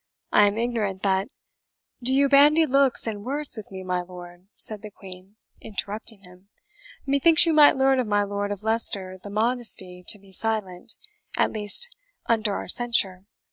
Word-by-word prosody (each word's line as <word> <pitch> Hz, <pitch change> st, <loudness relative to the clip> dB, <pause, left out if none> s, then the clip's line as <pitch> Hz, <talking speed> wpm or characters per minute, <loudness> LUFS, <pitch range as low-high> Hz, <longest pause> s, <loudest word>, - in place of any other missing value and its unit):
I 205 Hz, -, +5 dB
am 205 Hz, +1 st, -2 dB
ignorant 225 Hz, -5 st, -2 dB
that 195 Hz, 0 st, 0 dB, 0.4 s
" -, -, -65 dB, 0.3 s
"Do 250 Hz, +2 st, +1 dB
you 275 Hz, +1 st, +3 dB
bandy 295 Hz, +3 st, +5 dB
looks 275 Hz, -2 st, +3 dB
and 210 Hz, -3 st, -5 dB
words 285 Hz, +4 st, -5 dB
with 215 Hz, -3 st, -9 dB
me, 190 Hz, -1 st, -8 dB
my 180 Hz, -1 st, -2 dB
lord?" 175 Hz, 0 st, -13 dB
said 215 Hz, -2 st, -2 dB
the 215 Hz, -, -9 dB
Queen, 190 Hz, 0 st, -13 dB, 0.3 s
interrupting 215 Hz, 0 st, -4 dB
him; 180 Hz, +2 st, -19 dB, 0.6 s
"methinks 280 Hz, +5 st, +5 dB
you 330 Hz, -, +1 dB
might 300 Hz, -3 st, +6 dB
learn 265 Hz, 0 st, +3 dB
of 250 Hz, -, -1 dB
my 205 Hz, -1 st, +1 dB
Lord 205 Hz, 0 st, -4 dB
of 205 Hz, 0 st, -6 dB
Leicester 200 Hz, -4 st, -1 dB
the 205 Hz, -, -10 dB
modesty 210 Hz, -5 st, -2 dB
to -, -, -1 dB
be 195 Hz, -1 st, -20 dB
silent, 215 Hz, 0 st, -3 dB, 0.4 s
at -, -, +1 dB
least, 215 Hz, -, +1 dB, 0.3 s
under 215 Hz, -3 st, 0 dB
our -, -, -5 dB
censure. 195 Hz, -5 st, +3 dB
210 Hz, 175 wpm, -24 LUFS, 190-245 Hz, 0.6 s, might